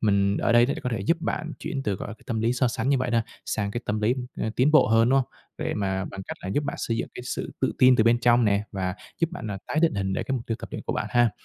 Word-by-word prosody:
mình 100 Hz, -1 st, +2 dB
ở 120 Hz, -, +1 dB
đây 120 Hz, +1 st, +6 dB
để 140 Hz, -, -1 dB
có 125 Hz, -, -2 dB
thể 110 Hz, -, -1 dB
giúp 165 Hz, -, +2 dB
bạn 160 Hz, -2 st, -3 dB
chuyển 135 Hz, -, -4 dB
từ, 105 Hz, -6 st, 0 dB
gọi -, -, -6 dB
là, 105 Hz, -, -6 dB
cái -, -, -24 dB
tâm 115 Hz, -4 st, -1 dB
lý 115 Hz, +2 st, +2 dB
so 125 Hz, 0 st, +2 dB
sánh 125 Hz, -, -2 dB
như 140 Hz, -1 st, +3 dB
vậy 130 Hz, -1 st, -1 dB
đó, 115 Hz, -1 st, +3 dB, 0.2 s
sang 100 Hz, -2 st, -2 dB
cái 120 Hz, -, -3 dB
tâm 105 Hz, +1 st, -1 dB
lý, 110 Hz, +4 st, +2 dB, 0.2 s
ơ, 110 Hz, -, -2 dB
tiến 130 Hz, +4 st, +4 dB
bộ 155 Hz, -, +5 dB
hơn, 115 Hz, +1 st, +4 dB
đúng 135 Hz, +2 st, +4 dB
hông? 130 Hz, -, -1 dB, 0.3 s
Để -, -, -2 dB
mà 95 Hz, -2 st, -1 dB
bằng 100 Hz, -1 st, -7 dB
cách -, -, -5 dB
là -, -, -6 dB
giúp 145 Hz, +10 st, 0 dB
bạn -, -, -3 dB
xây 115 Hz, -, -1 dB
dựng -, -, -2 dB
cái -, -, -7 dB
sự 125 Hz, -, -4 dB
tự -, -, +1 dB
tin 130 Hz, 0 st, +7 dB
từ 110 Hz, -, +4 dB
bên 115 Hz, +1 st, +4 dB
trong 120 Hz, 0 st, +4 dB
nè 100 Hz, -1 st, +2 dB
và 95 Hz, -2 st, -2 dB, 0.2 s
giúp 165 Hz, 0 st, +1 dB
bạn, 180 Hz, -9 st, -6 dB
ờ, 100 Hz, -1 st, -4 dB
tái 150 Hz, -, -1 dB
định 165 Hz, -1 st, +3 dB
hình 95 Hz, -1 st, -1 dB
để -, -, -1 dB
cái -, -, -4 dB
mục 120 Hz, -, -6 dB
tiêu 115 Hz, -, -2 dB
tập -, -, -7 dB
luyện -, -, -5 dB
của -, -, -3 dB
bạn -, -, -2 dB
ha. 120 Hz, -2 st, +4 dB
115 Hz, 330 wpm, -26 LUFS, 105-125 Hz, 0.3 s, tin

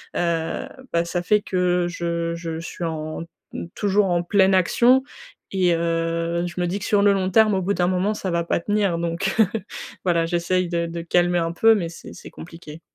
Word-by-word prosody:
heu, 170 Hz, +7 st, -1 dB, 0.3 s
bah, 170 Hz, 0 st, +2 dB
ça 175 Hz, +1 st, -3 dB
fait 210 Hz, +4 st, +2 dB
que 180 Hz, -2 st, 0 dB
je 170 Hz, -1 st, -2 dB
je 165 Hz, -1 st, -5 dB
suis 170 Hz, +1 st, -6 dB
en 155 Hz, 0 st, -4 dB, 0.3 s
mmh, -, -, -5 dB
toujours 205 Hz, 0 st, +2 dB
en 175 Hz, -1 st, +1 dB
pleine 190 Hz, +1 st, +3 dB
action 240 Hz, +8 st, +4 dB, 0.5 s
et 185 Hz, -2 st, +2 dB
heu, 165 Hz, 0 st, -1 dB
je 175 Hz, +1 st, -5 dB
me 175 Hz, -, 0 dB
dis 180 Hz, +3 st, -2 dB
que 200 Hz, -, -6 dB
sur 205 Hz, -1 st, +2 dB
le 205 Hz, 0 st, +5 dB
long 190 Hz, -1 st, 0 dB
terme, 215 Hz, +1 st, +4 dB
au 190 Hz, -, 0 dB
bout 195 Hz, +3 st, 0 dB
d'un 175 Hz, -2 st, +1 dB
moment, 185 Hz, +3 st, +1 dB
ça 200 Hz, -3 st, -4 dB
va 170 Hz, 0 st, 0 dB
pas -, -, 0 dB
tenir 200 Hz, -1 st, 0 dB
donc 170 Hz, +3 st, -2 dB
heu. 220 Hz, -, +6 dB, 0.6 s
Voilà, 170 Hz, -2 st, +2 dB
j'essaie 175 Hz, +2 st, 0 dB
de 170 Hz, -1 st, -1 dB
de 170 Hz, 0 st, -5 dB
calmer 175 Hz, +1 st, +2 dB
un 165 Hz, 0 st, -1 dB
peu, 225 Hz, +6 st, +5 dB
mais 175 Hz, -5 st, -2 dB
c'est 165 Hz, -, -11 dB
c'est -, -, -11 dB
compliqué. 165 Hz, -2 st, -11 dB
175 Hz, 210 wpm, -22 LUFS, 170-190 Hz, 0.6 s, heu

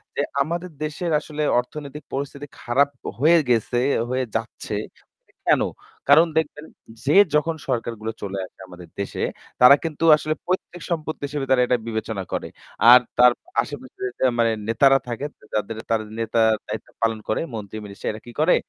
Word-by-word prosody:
যে, -, -, +1 dB, 0.2 s
আমাদের 170 Hz, +4 st, -2 dB
দেশের 155 Hz, +3 st, -3 dB
আসলে 150 Hz, 0 st, -4 dB, 0.2 s
অর্থনৈতিক 145 Hz, +3 st, -7 dB
পরিস্থিতি 140 Hz, +1 st, -4 dB
খারাপ 140 Hz, +4 st, +2 dB, 0.3 s
হয়ে 165 Hz, +5 st, +6 dB
গেছে, 120 Hz, +1 st, +2 dB, 0.3 s
হয়ে 130 Hz, 0 st, 0 dB
যাচ্ছে। 115 Hz, -1 st, -3 dB, 0.7 s
কেন? -, -, +5 dB, 0.5 s
কারণ 160 Hz, +4 st, +7 dB
দেখবেন, 155 Hz, -1 st, -1 dB, 0.4 s
যে 145 Hz, -, +3 dB, 0.2 s
যখন 160 Hz, +2 st, +2 dB
সরকারগুলো 115 Hz, -3 st, -2 dB
চলে 100 Hz, -1 st, -4 dB
আসে -, -, -20 dB
আমাদের 90 Hz, -1 st, -12 dB
দেশে, 100 Hz, -, -4 dB, 0.4 s
তারা 125 Hz, +3 st, +10 dB
কিন্তু 165 Hz, -1 st, -4 dB
আসলে 155 Hz, 0 st, -2 dB
পৈতৃক 180 Hz, -1 st, -3 dB
সম্পত্তি 155 Hz, -3 st, -3 dB
হিসেবে 140 Hz, -1 st, -3 dB
তারা 130 Hz, -, +5 dB
এটা 125 Hz, -, +2 dB
বিবেচনা 110 Hz, -3 st, -3 dB
করে। -, -, -2 dB, 0.4 s
আর 125 Hz, -, +11 dB, 0.2 s
তার 125 Hz, 0 st, +8 dB, 0.3 s
আশেপাশে 135 Hz, -1 st, -9 dB, 0.4 s
মানে 115 Hz, -1 st, +4 dB, 0.2 s
নেতারা 135 Hz, +4 st, +5 dB
থাকে, 120 Hz, +4 st, -4 dB, 0.3 s
তা 105 Hz, -, +3 dB
যারা 110 Hz, 0 st, -2 dB, 0.2 s
নেতার 115 Hz, 0 st, +3 dB, 0.2 s
দায়িত্ব 110 Hz, +1 st, -6 dB
পালন 115 Hz, -1 st, +1 dB
করে, 110 Hz, -, +1 dB
মন্ত্রী-মিনিস্টার 105 Hz, -1 st, -6 dB
এরা 110 Hz, 0 st, -9 dB
কী 120 Hz, -, -10 dB
করে 165 Hz, +3 st, +5 dB
130 Hz, 150 wpm, -23 LUFS, 110-150 Hz, 0.7 s, আর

